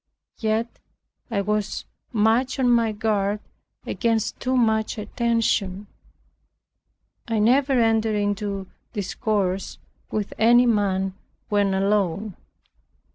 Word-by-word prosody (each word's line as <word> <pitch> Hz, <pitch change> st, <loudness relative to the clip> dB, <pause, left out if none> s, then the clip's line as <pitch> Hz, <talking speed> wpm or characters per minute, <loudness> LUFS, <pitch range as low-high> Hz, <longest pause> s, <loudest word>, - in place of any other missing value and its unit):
Yet 220 Hz, +1 st, -1 dB, 0.5 s
I 205 Hz, -4 st, 0 dB
was 210 Hz, +1 st, -2 dB, 0.3 s
much 230 Hz, +3 st, +2 dB
on 250 Hz, -2 st, +3 dB
my 230 Hz, -2 st, +3 dB
guard 210 Hz, -1 st, 0 dB, 0.5 s
against 225 Hz, -2 st, -1 dB
too 255 Hz, 0 st, 0 dB
much 220 Hz, -3 st, +1 dB
attention. 210 Hz, -3 st, 0 dB, 1.4 s
I 225 Hz, -1 st, 0 dB
never 260 Hz, +6 st, +3 dB
entered 225 Hz, -1 st, +2 dB
into 205 Hz, -1 st, -1 dB, 0.3 s
discourse 195 Hz, -2 st, -1 dB, 0.3 s
with 210 Hz, -1 st, -3 dB
any 240 Hz, +3 st, +6 dB
man 195 Hz, -4 st, +1 dB, 0.4 s
when 205 Hz, -2 st, +2 dB
alone. 200 Hz, 0 st, 0 dB
215 Hz, 95 wpm, -24 LUFS, 200-230 Hz, 1.4 s, any